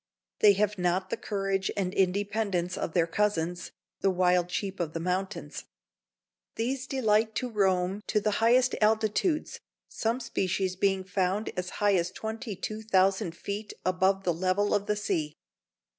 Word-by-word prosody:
They 205 -1 +7
have 205 0 0
not 180 +1 0
the - - +1
courage 195 -3 -2
and 185 -2 -1
independence 195 -1 0
of 160 - -3
their 170 -2 +3
cousins, 175 -1 -1 0.3
the 195 - +2
wild 180 -1 +2
sheep 195 +1 -3
of 165 -2 -2
the 165 - -3
mountains. 185 +4 -3 0.9
These 255 +3 -2
delight 220 -4 +1
to 250 - -1
roam 190 -1 +1
to 215 - +2
the 210 +1 0
highest 245 +3 +4
altitudes, 220 - +1 0.3
some 230 +3 -1
species 190 -5 -1
being 195 0 +1
found 190 +2 -1
as 180 0 -3 0.2
high 205 - +5
as 170 0 0
22,000 210 -3 -1
feet 205 +1 -5
above 190 +1 +2
the 175 - +1
level 185 +4 +1
of 205 -1 0
the 210 - +1
sea. 155 -7 -2
195 Hz, 145 wpm, -28 LUFS, 180-215 Hz, 0.9 s, They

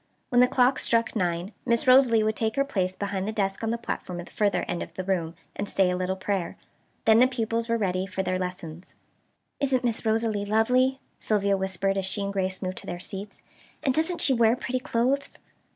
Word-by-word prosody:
When 245 -2 +4
the 250 - +6
clock 255 +1 +3
struck 230 0 +1
nine 175 -1 -1
Miss 235 -1 +1
Rosalie 255 -4 +6
would 215 0 0
take 220 0 -1
her 275 - +2
place 190 -9 -1
behind 200 -1 -3
the - - -1
desk 195 -3 -1
on 225 - 0
the 230 - 0
platform 180 -6 -5
at 175 - -6
the - - -16
further 205 -3 +1
end 175 - -3
of - - -6
the 185 - -3
room, 175 -3 -1 0.2
and 200 0 -4
say 190 -2 +2
a - - 0
little 185 +1 -1
prayer. 190 -2 -3 0.5
Then 220 0 +6
the 250 - +7
pupils 230 -2 -2
were 230 - +2
ready 185 -3 -1
for 190 0 -3
their 185 0 -1
lessons. 180 -2 -6 0.6
"Isn't 265 -3 +1
Miss 235 -3 -1
Rosalie 220 -2 0
lovely," 250 +6 +2 0.2
Sylvia 200 -2 +1
whispered 190 0 -1
as 195 - 0
she 190 +2 -1
and 200 0 -3
Grace 190 0 -2
moved 185 0 -3
to - - -13
their 175 - -4
seats, 195 +3 -7 0.4
"and 265 - +2
doesn't 320 +4 0
she 270 - +3
wear 230 -1 +4
pretty 255 0 -3
clothes?" 255 +3 -1
210 Hz, 215 wpm, -26 LUFS, 190-235 Hz, 0.6 s, the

